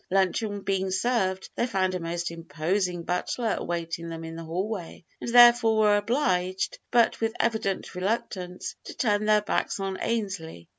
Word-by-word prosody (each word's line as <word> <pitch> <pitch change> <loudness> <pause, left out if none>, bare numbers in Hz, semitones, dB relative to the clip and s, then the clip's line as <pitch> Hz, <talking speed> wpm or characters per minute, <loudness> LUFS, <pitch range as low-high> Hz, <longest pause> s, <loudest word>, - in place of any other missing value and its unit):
Luncheon 200 +2 +1
being 190 -1 -1
served, 190 -2 0
they 240 - 0
found 185 -5 0
a 180 - -2
most 170 0 -3
imposing 170 +2 -2
butler 215 +6 -1
awaiting 170 -1 -4
them 165 0 -6
in 165 0 -7
the 165 - -7
hallway, 180 +1 -4 0.2
and - - -4
therefore 240 -2 +7
were 210 -1 +5
obliged, 190 -5 0
but 235 -2 +3
with 225 0 0
evident 220 -4 -1
reluctance, 185 -2 -3
to - - -8
turn 210 -3 +1
their 215 0 +4
backs 205 - -1
on 195 -1 -3
Ainslee. 195 - -3
190 Hz, 155 wpm, -27 LUFS, 175-220 Hz, 0.2 s, therefore